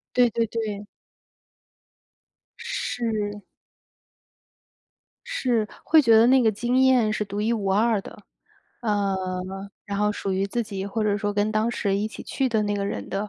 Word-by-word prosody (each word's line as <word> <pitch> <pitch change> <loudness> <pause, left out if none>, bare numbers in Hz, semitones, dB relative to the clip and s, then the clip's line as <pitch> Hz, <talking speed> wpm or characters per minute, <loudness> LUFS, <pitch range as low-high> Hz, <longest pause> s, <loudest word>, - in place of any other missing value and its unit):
对 245 -1 +5
对 230 +1 0
对。 210 -2 -4 1.7
是。 225 - -3 1.8
是， 250 - 0 0.2
会 320 - +6
觉 230 -4 +6
得 225 +1 +6
那 260 +1 +5
个 225 - +4
经 240 +5 0
验 255 -5 +4
是 210 - -1
独 200 +1 -4
一 220 +2 +1
无 200 -4 -1
二 220 +1 +2
的。 205 - -12 0.6
呃， 205 -3 +1 0.7
然 200 0 -4
后 210 0 +2
属 195 -1 -3
于 195 +1 0
自 235 +4 -1
己 195 -2 -5
或 215 +2 -2
者 205 -1 +2
说 205 0 -2
跟 205 +1 +1
当 220 +2 +1
时 200 -4 -1
一 210 +2 -1
起 - - -9
去 265 -2 -1
的 220 -2 +1
那 205 0 -1
个 200 0 -2
人 - - -4
的 200 +2 -2
215 Hz, 175 characters per minute, -24 LUFS, 205-235 Hz, 1.8 s, 会